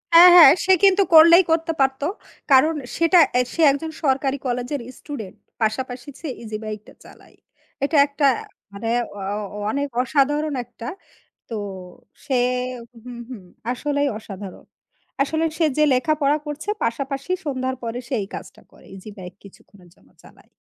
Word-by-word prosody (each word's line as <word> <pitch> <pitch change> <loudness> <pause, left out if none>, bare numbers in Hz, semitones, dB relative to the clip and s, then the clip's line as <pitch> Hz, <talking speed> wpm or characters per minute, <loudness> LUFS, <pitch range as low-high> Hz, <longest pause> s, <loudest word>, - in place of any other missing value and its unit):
হ্যাঁ, 350 +2 +10
হ্যাঁ, 320 -6 +10
সে 380 - +5
কিন্তু 395 0 +5
করলেই 335 +3 +8
করতে 325 0 +1
পারত। 265 0 +1 0.5
কারণ 290 +5 +5 0.2
সেটা 335 +2 +4
এ্যা 250 - +3
সে 335 - -2
একজন 315 +3 -4
সরকারি 270 -1 +1
কলেজের 250 +3 -3 0.2
স্টুডেন্ট, 225 -11 -8 0.3
পাশাপাশি 245 +4 -3
ছে 325 - -7 0.2
ইজি 215 -1 -5
বাইকটা 215 -1 -8
চালায়। - - -18 0.5
এটা 295 +2 +1
একটা 285 0 -1 0.5
মানে 205 +3 -5 0.3
অ - - -8 0.4
অ - - -6
অনেক 285 +3 -2 0.2
অসাধারণ 295 +3 0
একটা। 235 -1 -10 0.6
তো 230 - -5 0.7
সে 265 - -1 0.7
হুম, 245 -1 -9
হুম, 235 -7 -9 0.3
আসলেই 285 +3 -1
অসাধারণ। 195 -3 -10 0.6
আসলে 315 +3 -2
সে 330 - +2
যে 305 - +4
লেখাপড়া 290 +2 +1
করছে 295 +6 -6 0.2
পাশাপাশি 275 +6 -4
সন্ধ্যার 260 -2 -2
পরে 230 +1 -4
সে 265 - -6
এই 195 - -6
কাজটা - - -11
করে। - - -20
ইজি 195 +3 -11
বাইক 180 -1 -9
কিছুক্ষণের 190 -2 -18
জন্য - - -27
চালায়। - - -20
270 Hz, 150 wpm, -21 LUFS, 235-305 Hz, 0.7 s, হ্যাঁ